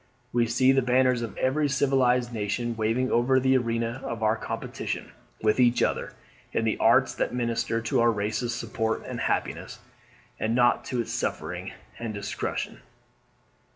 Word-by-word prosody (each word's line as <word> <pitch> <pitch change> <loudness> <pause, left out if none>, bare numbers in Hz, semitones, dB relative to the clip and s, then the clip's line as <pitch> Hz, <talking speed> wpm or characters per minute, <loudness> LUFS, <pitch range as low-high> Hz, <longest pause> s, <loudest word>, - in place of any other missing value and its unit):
We 120 -1 +3
see 130 +3 +4
the 135 0 +3
banners 125 0 +3
of 115 - -5
every 145 +3 +1
civilized 130 -3 +2
nation 115 +2 -2
waving 115 +4 0
over 130 +3 +3
the 130 +1 +3
arena 115 0 -1
of 115 -5 -4
our 110 +1 +3
competition - - -5 0.3
with 110 +3 +3
each 120 -1 +4
other, - - -1 0.4
in 115 - +1
the 110 - 0
arts 125 +3 +4
that - - -2
minister 115 -1 -1
to 115 +3 0
our 120 0 +5
race's 110 +3 -1
support 110 -1 -2
and - - -5
happiness, - - -2 0.6
and 110 +1 0
not 120 -1 +3
to 125 -2 -1
its 115 - -5
suffering - - -3 0.3
and 115 -3 -4
destruction. 100 0 -4
120 Hz, 155 wpm, -27 LUFS, 115-130 Hz, 0.6 s, our